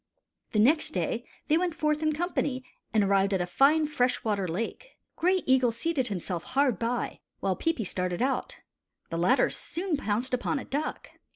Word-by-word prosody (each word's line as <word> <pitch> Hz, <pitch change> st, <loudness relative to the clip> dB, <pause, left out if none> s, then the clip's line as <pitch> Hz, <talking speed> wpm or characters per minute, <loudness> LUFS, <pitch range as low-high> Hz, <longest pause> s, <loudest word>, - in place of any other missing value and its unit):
The -, -, +1 dB
next 275 Hz, +7 st, +3 dB
day 220 Hz, +8 st, -1 dB, 0.2 s
they 315 Hz, +2 st, +4 dB
went 355 Hz, -2 st, -1 dB
forth 305 Hz, -1 st, 0 dB
in 310 Hz, 0 st, +2 dB
company 295 Hz, -5 st, -1 dB, 0.3 s
and 215 Hz, -2 st, +3 dB
arrived 195 Hz, 0 st, +3 dB
at -, -, 0 dB
a 175 Hz, -, 0 dB
fine 275 Hz, -, +4 dB
fresh 255 Hz, -4 st, 0 dB
water 205 Hz, -4 st, 0 dB
lake. 230 Hz, -, -5 dB, 0.2 s
Gray 365 Hz, +2 st, +2 dB
Eagle 260 Hz, -2 st, +4 dB
seated 270 Hz, +1 st, -1 dB
himself 180 Hz, -3 st, -3 dB
hard 260 Hz, -4 st, +1 dB
by, 240 Hz, +1 st, -2 dB, 0.2 s
while 190 Hz, -1 st, 0 dB
Peepi 325 Hz, -, -1 dB
started 180 Hz, -2 st, -2 dB
out. 260 Hz, 0 st, -1 dB, 0.5 s
The 165 Hz, -, -2 dB
latter 215 Hz, +10 st, +3 dB
soon 345 Hz, -2 st, -3 dB
pounced 240 Hz, +1 st, -1 dB
upon 250 Hz, +4 st, 0 dB
a 270 Hz, -, -5 dB
duck. 295 Hz, +3 st, -3 dB
255 Hz, 175 wpm, -28 LUFS, 200-305 Hz, 0.5 s, they